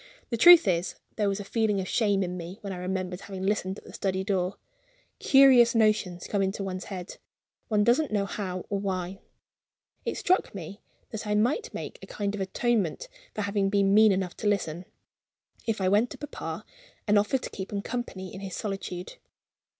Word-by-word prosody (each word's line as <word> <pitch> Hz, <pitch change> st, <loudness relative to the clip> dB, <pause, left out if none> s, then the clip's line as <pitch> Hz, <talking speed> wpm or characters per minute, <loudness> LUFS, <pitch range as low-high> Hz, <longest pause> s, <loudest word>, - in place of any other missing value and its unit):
The 235 Hz, -, 0 dB
truth 345 Hz, +7 st, +9 dB
is, 175 Hz, 0 st, 0 dB, 0.2 s
there 205 Hz, -2 st, +1 dB
was 195 Hz, +1 st, -2 dB
a -, -, -4 dB
feeling 210 Hz, -1 st, 0 dB
of 185 Hz, -, -3 dB
shame 205 Hz, -3 st, +2 dB
in 180 Hz, 0 st, -3 dB
me 175 Hz, +2 st, -7 dB
when 200 Hz, -2 st, -5 dB
I -, -, -6 dB
remembered 185 Hz, 0 st, -3 dB
having 190 Hz, -2 st, -7 dB
listened 195 Hz, -1 st, 0 dB
at -, -, -12 dB
the -, -, -13 dB
study 190 Hz, -1 st, -1 dB
door. 190 Hz, -2 st, 0 dB, 0.6 s
Curious 265 Hz, -4 st, +6 dB
notions 215 Hz, -5 st, +2 dB
come 200 Hz, -, 0 dB
into 195 Hz, +1 st, -1 dB
one's 185 Hz, -1 st, -4 dB
head 185 Hz, -2 st, -7 dB, 0.5 s
one 210 Hz, -3 st, +2 dB
doesn't 250 Hz, +7 st, +3 dB
know 205 Hz, -2 st, +1 dB
how 185 Hz, -2 st, -4 dB
or 200 Hz, -, 0 dB
why. 190 Hz, -1 st, -3 dB, 0.8 s
It -, -, -3 dB
struck 370 Hz, -, +1 dB
me 195 Hz, +2 st, -8 dB, 0.3 s
that 220 Hz, -1 st, -5 dB
I 210 Hz, -, +1 dB
might 255 Hz, -, +1 dB
make -, -, -7 dB
a -, -, -10 dB
kind 200 Hz, -1 st, -3 dB
of 205 Hz, -, -4 dB
atonement 220 Hz, -, 0 dB, 0.3 s
for 215 Hz, -, -2 dB
having 200 Hz, -1 st, 0 dB
been 200 Hz, -1 st, +3 dB
mean 215 Hz, 0 st, +7 dB
enough 185 Hz, -2 st, -1 dB
to 210 Hz, -, -2 dB
listen, 180 Hz, -4 st, -1 dB, 0.8 s
if 225 Hz, -2 st, 0 dB
I 190 Hz, -, +1 dB
went 210 Hz, +5 st, +3 dB
to -, -, -9 dB
papa, 295 Hz, -1 st, -6 dB, 0.4 s
and 210 Hz, 0 st, +5 dB
offered 230 Hz, +6 st, 0 dB
to -, -, -5 dB
keep 190 Hz, -1 st, -6 dB
him 200 Hz, -1 st, -3 dB
company 210 Hz, -6 st, -5 dB
in 190 Hz, -, -7 dB
his 195 Hz, -2 st, -6 dB
solitude. 195 Hz, -3 st, -5 dB
200 Hz, 195 wpm, -27 LUFS, 185-215 Hz, 0.8 s, truth